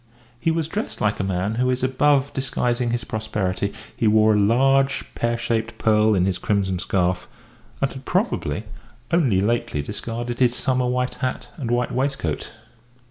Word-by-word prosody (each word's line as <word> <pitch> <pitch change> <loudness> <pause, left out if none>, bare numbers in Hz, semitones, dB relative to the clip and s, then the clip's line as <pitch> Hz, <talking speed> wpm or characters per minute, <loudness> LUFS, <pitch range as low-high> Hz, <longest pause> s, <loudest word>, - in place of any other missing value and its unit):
He 165 - +1
was 160 -1 0
dressed 205 +6 -4
like 105 -1 0
a - - 0
man 95 +2 -1
who 125 - +2
is 125 0 0
above 135 +1 +2
disguising 125 -2 0
his 120 -1 -1
prosperity; 100 -3 -2 0.2
he 115 - +1
wore 110 0 +5
a 105 - +3
large, 135 +6 +3
pear 120 0 0
shaped 115 -1 -2
pearl 110 -1 +3
in 90 -1 +3
his 95 -2 -1
crimson 95 -3 0
scarf, 90 0 0 0.6
and 135 - +2
had 130 - -9
probably 185 - -1 0.5
only 135 - +3
lately 105 -9 0
discarded 115 +6 -5
his 125 -1 +3
summer 125 -1 +1
white 125 0 0
hat 130 -1 -2
and 130 -7 -4
white 120 0 +1
waistcoat. 130 - -2
120 Hz, 165 wpm, -23 LUFS, 105-130 Hz, 0.6 s, wore